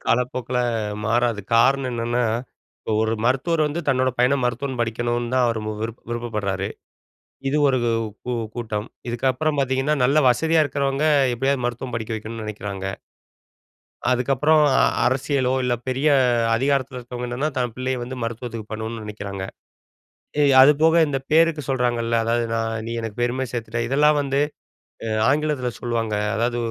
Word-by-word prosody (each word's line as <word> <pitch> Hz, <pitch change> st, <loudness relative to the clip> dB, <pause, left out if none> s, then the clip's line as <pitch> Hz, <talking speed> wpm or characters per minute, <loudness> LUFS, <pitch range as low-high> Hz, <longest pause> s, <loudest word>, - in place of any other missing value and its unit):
காலப்போக்கில 125 Hz, 0 st, 0 dB, 0.5 s
மாறாது. 115 Hz, -1 st, +1 dB
காரணம் 130 Hz, +3 st, +3 dB
என்னன்னா, 120 Hz, +1 st, 0 dB, 0.6 s
இப்போ 110 Hz, -, -4 dB
ஒரு 110 Hz, 0 st, 0 dB
மருத்துவர் 155 Hz, +6 st, +2 dB
வந்து 155 Hz, +4 st, -2 dB
தன்னோட 130 Hz, 0 st, +2 dB
பையன 125 Hz, +3 st, +4 dB
மருத்துவம் 125 Hz, +1 st, -2 dB
படிக்கணும்னு 120 Hz, +1 st, -1 dB
தான் 130 Hz, -1 st, +4 dB
அவர் 115 Hz, -2 st, -1 dB, 0.2 s
விரு 115 Hz, 0 st, -2 dB, 0.2 s
விருப்பப்படுறாரு. 105 Hz, -5 st, -2 dB, 0.8 s
இது 145 Hz, -, 0 dB
ஒரு 130 Hz, -2 st, +2 dB, 0.5 s
கு 125 Hz, 0 st, -2 dB, 0.2 s
கூட்டம் 110 Hz, -2 st, -4 dB, 0.2 s
இதுக்கப்புறம் 130 Hz, +5 st, 0 dB
பார்த்தீங்கன்னா, 135 Hz, +3 st, +1 dB
நலல 145 Hz, +4 st, +4 dB
வசதியா 160 Hz, +5 st, +3 dB
இருக்கிறவங்க 140 Hz, +1 st, 0 dB, 0.3 s
எப்டியாவது 135 Hz, +1 st, 0 dB
மருத்துவம் 120 Hz, 0 st, -4 dB
படிக்க 110 Hz, 0 st, -4 dB
வைக்கணும்னு 110 Hz, +1 st, -6 dB
நெனக்கிறாங்க. 100 Hz, -2 st, -5 dB, 1.3 s
அதுக்கு 125 Hz, +2 st, +1 dB
அப்புறம் 150 Hz, +3 st, +4 dB, 0.2 s
அ -, -, +4 dB, 0.3 s
அரசியலோ 130 Hz, 0 st, +1 dB
இல்ல 125 Hz, -1 st, +1 dB
பெரிய 135 Hz, +4 st, +1 dB, 0.5 s
அதிகாரத்தில 135 Hz, +1 st, 0 dB
இருக்கிறவங்க 125 Hz, 0 st, -6 dB
என்னன்னா, 130 Hz, +6 st, -1 dB
தன் 125 Hz, -2 st, -1 dB
பிள்ளய 130 Hz, 0 st, -2 dB
வந்து 130 Hz, +2 st, -6 dB
மருத்துவத்துக்கு 115 Hz, -1 st, -5 dB
பண்ணணும்னு 110 Hz, +1 st, -5 dB
நெனக்கிறாங்க. 100 Hz, -2 st, -6 dB, 1.2 s
அது 135 Hz, +3 st, +8 dB
போக 160 Hz, +1 st, +5 dB
இந்த 135 Hz, -2 st, -1 dB
பேருக்கு 160 Hz, -1 st, +4 dB
சொல்றாங்க 125 Hz, -3 st, +1 dB
இல்ல, 115 Hz, 0 st, -1 dB
அதாது 120 Hz, +1 st, +1 dB
நான் 115 Hz, 0 st, -1 dB
நீ 115 Hz, -, -4 dB
எனக்கு 115 Hz, -1 st, -6 dB
பெருமைய 125 Hz, +1 st, -1 dB
சேர்த்துட்டா. 115 Hz, -1 st, -3 dB
இதெல்லாம் 150 Hz, +2 st, +4 dB
வந்து 140 Hz, 0 st, 0 dB, 0.7 s
அ -, -, -2 dB, 0.2 s
ஆங்கிலத்தில 145 Hz, -3 st, 0 dB
சொல்வாங்க. 115 Hz, -2 st, -2 dB, 0.2 s
அதாது 120 Hz, +1 st, 0 dB
125 Hz, 140 wpm, -22 LUFS, 115-135 Hz, 1.3 s, அது